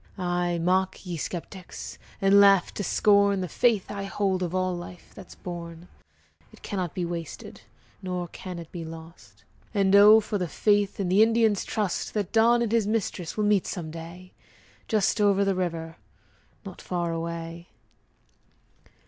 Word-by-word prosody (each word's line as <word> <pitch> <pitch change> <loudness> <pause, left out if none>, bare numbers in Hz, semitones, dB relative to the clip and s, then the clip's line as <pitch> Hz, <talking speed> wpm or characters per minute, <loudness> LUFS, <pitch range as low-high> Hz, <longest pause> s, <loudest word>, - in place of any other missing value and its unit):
Ay, 175 -1 -1
mock, 185 +3 0
ye 175 -1 -4
skeptics, 180 +3 -7 0.2
And 195 +1 +5
laugh 195 -2 +5
to 205 - -4
scorn 200 0 +3
The 180 - -3
faith 215 +3 +1
I 200 -1 -4
hold 195 -2 -1
Of 180 0 -2
all 185 -1 0
life 175 0 -10
that's 190 -4 -12
born; 170 -1 -8 0.6
It - - -19
cannot 185 -6 -4
be 180 - -1
wasted, 170 -2 -7 0.4
Nor 180 -2 -3
can 180 +1 -8
it 165 -2 -9
be 170 -2 -6
lost. 160 -10 -12 0.3
And 195 -1 +3
oh, 210 +2 +9
for 210 -1 -3
the 180 - -1
faith, 205 +3 +1
And 185 -2 -1
the 195 +3 +5
Indian's 225 -2 +3
trust, 210 -3 -3
That 205 -4 -2
Don 235 +1 +4
and 225 - -2
his 225 -3 +2
mistress 210 -6 -2
Will 215 - +1
meet 205 -2 +2
some 165 -4 -5
day 170 +3 -10 0.5
Just 215 -1 +1
over 200 -1 +3
the 195 - +2
river 165 -3 -4 0.7
Not 190 -2 -9
far 175 -2 -2
away! 165 +1 -5
185 Hz, 160 wpm, -26 LUFS, 170-200 Hz, 0.7 s, oh